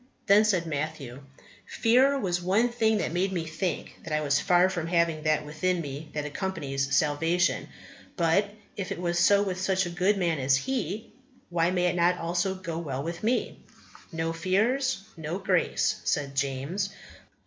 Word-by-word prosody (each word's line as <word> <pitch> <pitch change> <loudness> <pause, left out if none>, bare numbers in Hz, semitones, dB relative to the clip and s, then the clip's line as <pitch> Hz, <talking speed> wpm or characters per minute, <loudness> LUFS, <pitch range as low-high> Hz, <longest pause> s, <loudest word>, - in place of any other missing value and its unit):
Then 205 +2 +6
said 185 -5 +1
Matthew, 145 -4 -4 0.5
"Fear 255 +5 +3
was 180 -8 -1
one 200 +7 +2
thing 220 -2 +2
that 165 - -2
made 185 +2 0
me 170 -3 -2
think 160 +2 -4
that 165 - -8
I 150 0 +1
was 145 -1 +2
far 180 -1 +4
from 170 -3 -3
having 170 -2 +1
that 155 -1 +1
within 180 +4 -1
me 145 0 -6
that 150 -1 -3
accompanies 145 -5 -2
salvation; 165 +5 +1 0.5
but 175 +4 +2 0.3
if 195 -3 -5
it - - -3
was 175 0 -1
so 200 +3 +5
with 185 -2 -3
such 190 0 +1
a 175 - -4
good 185 +4 +2
man 170 -5 0
as 135 0 +3
he, 215 - -3 0.4
why 170 0 +2
may 180 -1 +1
it 180 - +1
not 175 +1 +3
also 175 +3 -1
go 170 -3 -5
well 140 -5 -4
with 170 +2 -5
me?" 240 +3 -1 0.5
"No 165 0 -2
fears, 215 +10 +1 0.2
no 160 +2 -4
grace," 185 -2 +1
said 140 -2 -1
James. 140 +8 -2
175 Hz, 170 wpm, -27 LUFS, 155-190 Hz, 0.5 s, Then